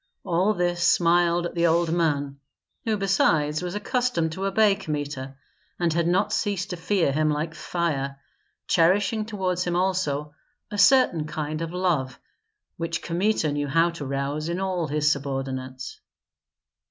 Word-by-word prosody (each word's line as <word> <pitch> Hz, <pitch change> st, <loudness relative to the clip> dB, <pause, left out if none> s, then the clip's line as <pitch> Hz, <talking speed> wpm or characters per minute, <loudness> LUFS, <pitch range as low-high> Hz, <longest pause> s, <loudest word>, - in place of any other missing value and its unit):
All 190 Hz, +4 st, +1 dB
this 175 Hz, -1 st, 0 dB
smiled 175 Hz, 0 st, +3 dB
at -, -, -4 dB
the 170 Hz, 0 st, +2 dB
old 165 Hz, 0 st, +2 dB
man, 145 Hz, -5 st, 0 dB, 0.5 s
who 220 Hz, -2 st, +1 dB
besides 160 Hz, -6 st, +2 dB
was 180 Hz, +1 st, -4 dB
accustomed 210 Hz, -6 st, 0 dB
to 190 Hz, +4 st, -3 dB
obey 205 Hz, +1 st, +4 dB
Kmita, 145 Hz, -7 st, -5 dB, 0.4 s
and 170 Hz, -2 st, +1 dB
had 170 Hz, 0 st, +1 dB
not 185 Hz, +4 st, +1 dB
ceased 200 Hz, -2 st, -1 dB
to -, -, -2 dB
fear 175 Hz, -2 st, +1 dB
him 155 Hz, +2 st, +1 dB
like 150 Hz, +2 st, -2 dB
fire, 140 Hz, -7 st, -2 dB, 0.5 s
cherishing 205 Hz, +6 st, +2 dB
toward 190 Hz, -5 st, -2 dB
him 175 Hz, -1 st, -1 dB
also 170 Hz, -6 st, 0 dB, 0.4 s
a 205 Hz, -, -4 dB
certain 200 Hz, -, +4 dB
kind 155 Hz, 0 st, -4 dB
of 165 Hz, 0 st, -3 dB
love, 170 Hz, -8 st, -1 dB, 0.6 s
which 165 Hz, 0 st, -3 dB
Kmita 175 Hz, -2 st, 0 dB
knew 145 Hz, 0 st, -2 dB
how 165 Hz, +5 st, +3 dB
to 170 Hz, -3 st, -7 dB
rouse 140 Hz, +3 st, -2 dB
in 170 Hz, +2 st, -2 dB
all 185 Hz, -4 st, -1 dB
his 150 Hz, 0 st, +2 dB
subordinates. 135 Hz, -, -4 dB
170 Hz, 150 wpm, -25 LUFS, 150-185 Hz, 0.6 s, obey